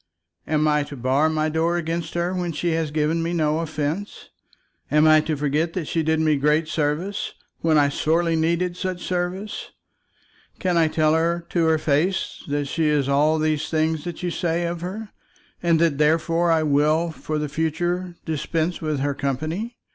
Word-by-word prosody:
Am 155 0 +2
I 150 0 +3
to 145 - -9
bar 130 +5 +2
my 155 0 0
door 165 +2 +1
against 165 0 -3
her 175 +1 0
when 175 -2 -2
she 170 +3 -1
has 160 -1 0
given 155 +2 0
me 165 +1 -2
no 155 -2 +1
offence? 160 +4 -4 0.6
Am 150 +2 +4
I 155 0 +7
to 155 -1 -2
forget 150 +4 0
that 180 -4 -3
she 165 - -1
did 160 0 +1
me 155 -2 +3
great 150 +3 +2
service, 160 +7 -2 0.2
when 160 -1 +3
I 145 -1 +4
sorely 165 +3 +1
needed 170 +2 0
such 185 -1 -4
services? 185 +3 -3 0.9
Can 180 -2 0
I 165 -1 +4
tell 155 0 +2
her 170 +1 +1
to 170 -2 +1
her 160 0 +4
face 155 +5 0
that 145 0 -1
she 155 +3 0
is 145 -3 +2
all 150 +3 +3
these 155 -1 0
things 160 -1 0
that 175 0 -6
you 175 - -1
say 170 0 -1
of 170 0 -3
her, 205 +5 -5 0.5
and 170 -2 +3
that 160 -4 +2
therefore 165 +2 +2
I 160 -1 +3
will 155 +3 +2
for 155 -1 -4
the 150 0 -1
future 175 +4 -2
dispense 160 +2 -2
with 155 -3 -1
her 145 0 0
company? 155 - -3
160 Hz, 185 wpm, -23 LUFS, 150-170 Hz, 0.9 s, I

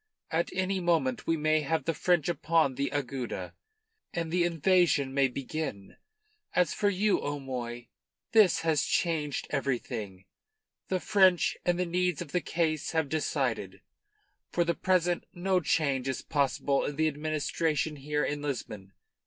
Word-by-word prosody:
At 165 +1 0
any 190 +1 -1
moment 160 -8 0
we 165 - +2
may 155 +1 +2
have 150 0 -1
the 165 - +1
French 175 -1 +1
upon 165 -3 +2
the 140 +2 -1
Agueda, 135 -3 -4 0.6
and 165 -2 -3
the 175 0 +2
invasion 170 -5 +2
may 140 -1 +4
begin. 130 -5 -5 0.6
As 180 -4 +3
for 205 - +1
you, 200 +1 +1
O'Moy, 125 -4 -4 0.4
this 215 -5 +5
has 160 -3 +2
changed 155 -4 0
everything. 110 -8 -3 0.6
The 185 - 0
French 190 -3 +4
and 175 0 +2
the 180 - 0
needs 180 -2 0
of 140 - -6
the 180 - +1
case 160 -3 -1
have 160 -3 +1
decided. 125 -11 -1 0.7
For 175 - +2
the 170 0 +1
present 180 -1 +1
no 185 +1 +1
change 140 -5 0
is 130 - -2
possible 140 -1 +1
in 145 - -3
the 160 +2 +2
administration 155 0 -1
here 150 +2 -1
in 145 0 -2
Lisbon. 110 -9 -5
155 Hz, 145 wpm, -29 LUFS, 135-175 Hz, 0.7 s, this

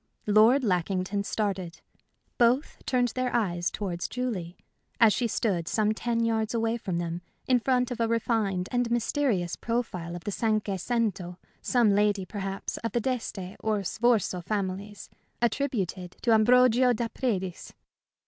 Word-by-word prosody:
Lord 220 +6 +5
Lackington 190 0 0
started. 195 -5 -3 0.6
Both 245 +5 +2
turned 245 -2 +2
their 255 0 -2
eyes 175 -7 0
towards 180 -4 -4
Julie, 210 -9 -4 0.4
as 225 -3 +6
she 240 +4 0
stood 190 -7 -1
some 215 -1 +1
ten 230 +1 -1
yards 225 0 0
away 225 0 0
from 190 -6 -3
them, 170 0 -3 0.2
in 255 -1 +3
front 250 0 +1
of 245 - -4
a 230 - +2
refined 220 -5 0
and 245 -1 +1
mysterious 235 - 0
profile 185 -8 -3
of 175 - -8
the 205 - -3
cinque 215 -1 0
cento 195 -5 -1 0.2
some 240 -4 +3
lady, 205 -1 +2
perhaps, 195 -1 -4
of 230 -2 -4
the 240 - +2
d'Este 220 -7 -3
or 215 -2 -1
Sforza 215 -3 +1
families, 200 +1 -4 0.3
attributed 215 - -1
to 235 - +3
Ambrogio 250 +2 +5
da 235 0 -1
Predis. 195 -7 -3
215 Hz, 145 wpm, -27 LUFS, 190-240 Hz, 0.6 s, as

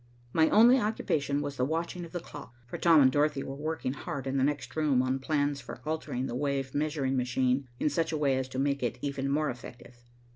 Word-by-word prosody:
My 160 -1 +4
only 240 +5 +7
occupation 145 - -1
was 140 -1 -5
the 125 - +1
watching 170 +4 -2
of 165 - -13
the 175 - -3
clock, 140 -6 -11
for 120 - -7
Tom 165 -3 +6
and 130 -1 +6
Dorothy 145 0 +1
were 135 - -6
working 145 -2 -3
hard 140 -1 -5
in 135 0 -1
the 130 - +2
next 140 -3 -2
room 145 -5 +2
on 130 +1 0
plans 145 0 0
for - - -9
altering 155 -5 -2
the 125 - -4
wave 135 0 -2
measuring 145 -3 0
machine 130 +1 +1
in - - +1
such 160 +3 0
a 155 - -1
way 140 -3 +2
as 130 0 -2
to 130 - -7
make 140 +1 0
it 120 -1 -1
even 140 -1 -2
more 150 +2 +1
effective. 120 0 -12
140 Hz, 225 wpm, -29 LUFS, 130-155 Hz, -, only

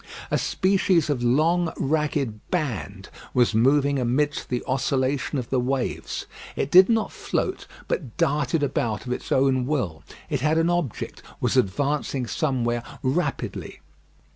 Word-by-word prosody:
A - - +3
species 185 -5 +2
of 130 -4 -1
long 160 +8 +2
ragged 140 -6 -1
band 110 - -3 0.3
was 120 -3 +4
moving 140 +4 +3
amidst 130 +4 0
the 125 -1 -1
oscillation 135 +2 0
of 125 -3 -4
the 130 - +2
waves. 130 +1 -2 0.3
It 135 - -2
did 185 +3 +8
not 225 -2 +1
float, - - -3 0.2
but 130 -10 -3
darted 145 +1 +1
about 115 -6 -1
of 125 - -1
its - - -7
own 130 -1 +3
will. 125 - -1 0.3
It - - -2
had 155 +2 +2
an 165 +1 +3
object; 175 - -2 0.2
was - - 0
advancing 140 +4 0
somewhere 120 -1 0 0.2
rapidly. 140 +7 -2
135 Hz, 140 wpm, -24 LUFS, 125-155 Hz, 0.3 s, did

